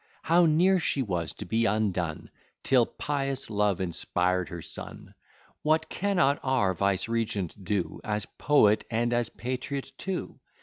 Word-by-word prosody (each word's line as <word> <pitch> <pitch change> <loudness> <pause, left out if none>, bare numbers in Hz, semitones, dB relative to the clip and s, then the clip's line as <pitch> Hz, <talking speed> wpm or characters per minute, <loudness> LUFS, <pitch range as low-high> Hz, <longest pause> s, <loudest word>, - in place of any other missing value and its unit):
How 170 +1 +4
near 180 +4 +4
was 90 - -1
she - - -5
to 105 - -7
be 115 +5 +1
undone, 95 -7 -1 0.3
Till 125 -3 +4
pious 135 -5 -2
love 105 -3 +1
inspired 90 -1 0
her 85 -1 -7
son! 85 - -6 0.5
What 155 +1 +1
cannot 180 -8 +1
our 130 -8 +1
vicegerent 100 0 -1
do, 100 -2 -2
As 105 -1 -2
poet 110 -8 +3
and 120 +1 0
as 120 -1 +1
patriot 130 +2 -4
too? 190 -2 -4
115 Hz, 135 wpm, -28 LUFS, 95-140 Hz, 0.5 s, How